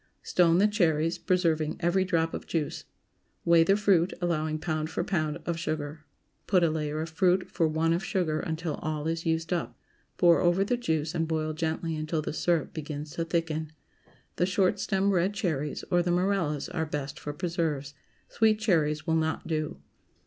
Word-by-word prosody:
✠ -, -, -39 dB, 0.2 s
Stone 170 Hz, -1 st, +4 dB
the 200 Hz, +3 st, +5 dB
cherries, 165 Hz, -6 st, +1 dB
preserving 165 Hz, -4 st, +1 dB
every 175 Hz, +2 st, +2 dB
drop 165 Hz, -3 st, 0 dB
of -, -, -6 dB
juice. 155 Hz, -3 st, -2 dB, 0.6 s
Weigh 170 Hz, -1 st, +6 dB
the 195 Hz, +4 st, +3 dB
fruit, 190 Hz, -4 st, +3 dB
allowing 155 Hz, -3 st, 0 dB
pound 155 Hz, -1 st, -2 dB
for 160 Hz, -, -2 dB
pound 155 Hz, -5 st, -1 dB
of 170 Hz, -1 st, -2 dB
sugar. 155 Hz, -1 st, -4 dB, 0.4 s
Put 185 Hz, -3 st, +4 dB
a 165 Hz, -, +3 dB
layer 155 Hz, -1 st, -2 dB
of 160 Hz, -, -4 dB
fruit 185 Hz, +2 st, +2 dB
for 165 Hz, -, +2 dB
one 160 Hz, +1 st, +1 dB
of 175 Hz, +3 st, -1 dB
sugar 180 Hz, -7 st, 0 dB
until 160 Hz, -1 st, -3 dB
all 155 Hz, -1 st, -3 dB
is 165 Hz, +1 st, -2 dB
used 165 Hz, +1 st, 0 dB
up; 175 Hz, -, -3 dB, 0.4 s
pour 170 Hz, -2 st, +5 dB
over 175 Hz, +2 st, +3 dB
the 225 Hz, +5 st, +1 dB
juice 160 Hz, -10 st, -1 dB
and 165 Hz, -1 st, 0 dB
boil 155 Hz, -1 st, -1 dB
gently 160 Hz, +1 st, -2 dB
until 155 Hz, 0 st, -2 dB
the -, -, -3 dB
syrup 165 Hz, 0 st, 0 dB
begins 150 Hz, -1 st, -6 dB
to 165 Hz, -, -3 dB
thicken. 160 Hz, -2 st, -2 dB, 0.6 s
The 180 Hz, -, +2 dB
short 190 Hz, +1 st, +2 dB
stem 195 Hz, 0 st, +1 dB
red 190 Hz, +2 st, +1 dB
cherries, 155 Hz, -8 st, -2 dB
or 175 Hz, -, +4 dB
the 175 Hz, -, -1 dB
Morellas 175 Hz, -5 st, 0 dB
are 160 Hz, 0 st, -2 dB
best 145 Hz, -2 st, -4 dB
for 150 Hz, -, -5 dB
preserves. 150 Hz, -3 st, -2 dB, 0.3 s
Sweet 220 Hz, -1 st, +3 dB
cherries 155 Hz, -8 st, +1 dB
will 165 Hz, -, +1 dB
not 160 Hz, 0 st, -1 dB
do. 155 Hz, -2 st, -2 dB
165 Hz, 185 wpm, -28 LUFS, 155-180 Hz, 0.6 s, Weigh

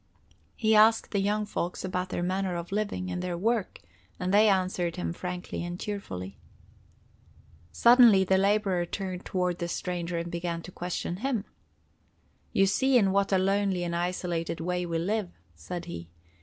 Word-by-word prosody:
He 220 Hz, -1 st, +2 dB
asked 220 Hz, +1 st, +5 dB
the 200 Hz, -, +1 dB
young 210 Hz, +2 st, 0 dB
folks 180 Hz, -3 st, -3 dB
about 180 Hz, 0 st, -2 dB
their 175 Hz, -, -2 dB
manner 185 Hz, 0 st, -1 dB
of 170 Hz, +1 st, -5 dB
living, 200 Hz, -3 st, -2 dB
and 180 Hz, 0 st, -3 dB
their 180 Hz, -1 st, -3 dB
work, 220 Hz, +2 st, -1 dB, 0.4 s
and 180 Hz, +1 st, -1 dB
they 210 Hz, +1 st, +6 dB
answered 185 Hz, -3 st, 0 dB
him 180 Hz, -2 st, -3 dB
frankly 180 Hz, 0 st, -5 dB
and 175 Hz, +1 st, -5 dB
cheerfully. 100 Hz, -, -6 dB, 1.3 s
Suddenly 235 Hz, -5 st, +7 dB
the 190 Hz, 0 st, +3 dB
laborer 195 Hz, -2 st, +2 dB
turned 185 Hz, -1 st, -5 dB
toward 180 Hz, -2 st, -1 dB
the 170 Hz, -, -2 dB
stranger 175 Hz, 0 st, -3 dB
and 170 Hz, 0 st, -4 dB
began 170 Hz, -1 st, -3 dB
to 180 Hz, -, -9 dB
question 175 Hz, 0 st, -4 dB
him. 235 Hz, -2 st, -1 dB, 1.1 s
"You 195 Hz, -, +4 dB
see 260 Hz, +6 st, +3 dB
in 195 Hz, -5 st, +3 dB
what 200 Hz, +1 st, +1 dB
a 190 Hz, -, +4 dB
lonely 195 Hz, -1 st, +1 dB
and 170 Hz, -1 st, -2 dB
isolated 175 Hz, -1 st, -2 dB
way 180 Hz, +1 st, -2 dB
we 165 Hz, -1 st, -1 dB
live," 200 Hz, +3 st, -1 dB, 0.2 s
said 175 Hz, -1 st, -7 dB
he. 85 Hz, -, -7 dB
185 Hz, 165 wpm, -28 LUFS, 175-200 Hz, 1.3 s, Suddenly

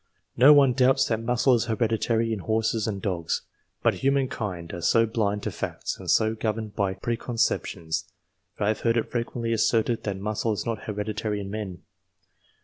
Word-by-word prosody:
No 135 Hz, +5 st, +8 dB
one 140 Hz, -3 st, +6 dB
doubts 135 Hz, +1 st, +4 dB
that 110 Hz, -1 st, 0 dB
muscle 125 Hz, +3 st, +2 dB
is 120 Hz, -1 st, +2 dB
hereditary 115 Hz, 0 st, 0 dB
in 110 Hz, -, -3 dB
horses 110 Hz, +2 st, 0 dB
and 100 Hz, -3 st, -4 dB
dogs, 85 Hz, -5 st, -1 dB, 0.4 s
but -, -, +4 dB
humankind 115 Hz, -11 st, -1 dB
are 85 Hz, -, -5 dB
so 115 Hz, +6 st, +4 dB
blind 105 Hz, -2 st, -1 dB
to -, -, -2 dB
facts -, -, -4 dB
and -, -, -7 dB
so 110 Hz, 0 st, +3 dB
governed 110 Hz, -1 st, -3 dB
by 100 Hz, -3 st, 0 dB
preconceptions, 95 Hz, -7 st, -2 dB, 0.5 s
that -, -, -1 dB
I -, -, +2 dB
have 110 Hz, -, 0 dB
heard 115 Hz, 0 st, +2 dB
it 115 Hz, -, -1 dB
frequently 115 Hz, -1 st, -2 dB
asserted 115 Hz, +1 st, +2 dB
that 100 Hz, -2 st, -2 dB
muscle 105 Hz, +2 st, -1 dB
is 105 Hz, -, -4 dB
not 115 Hz, -3 st, -3 dB
hereditary 105 Hz, 0 st, -3 dB
in 100 Hz, -1 st, -6 dB
men. 95 Hz, -4 st, -5 dB
110 Hz, 175 wpm, -26 LUFS, 105-115 Hz, 0.5 s, No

